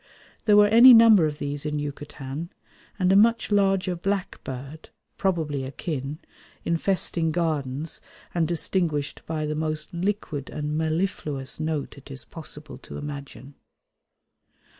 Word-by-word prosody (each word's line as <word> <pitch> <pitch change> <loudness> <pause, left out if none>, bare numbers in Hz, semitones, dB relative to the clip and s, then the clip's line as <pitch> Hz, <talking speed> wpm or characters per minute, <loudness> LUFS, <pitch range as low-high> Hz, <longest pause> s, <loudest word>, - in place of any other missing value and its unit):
There 210 -2 +6
were 210 - +8
any 235 +4 +9
number 220 -7 +7
of 150 -1 -5
these 145 -1 -4
in 150 0 -2
Yucatan, 145 +1 -6 0.5
and 185 -2 +2
a - - +5
much 230 +2 +4
larger 195 -2 +2
black 195 +2 -3
bird, 135 +4 -8 0.3
probably 160 -8 0
akin, 140 +1 -4 0.5
infesting 170 -1 +1
gardens 155 -3 -2 0.3
and 170 -2 +1
distinguished 165 -3 -1
by 155 -1 -2
the 150 - -2
most 155 0 -3
liquid 170 -6 -3
and 150 0 -3
mellifluous 155 -4 -2
note 155 -3 -3
it 140 - -16
is 135 -1 -8
possible 155 -2 -9
to - - -9
imagine. 140 -1 -8
155 Hz, 130 wpm, -25 LUFS, 145-185 Hz, 0.5 s, any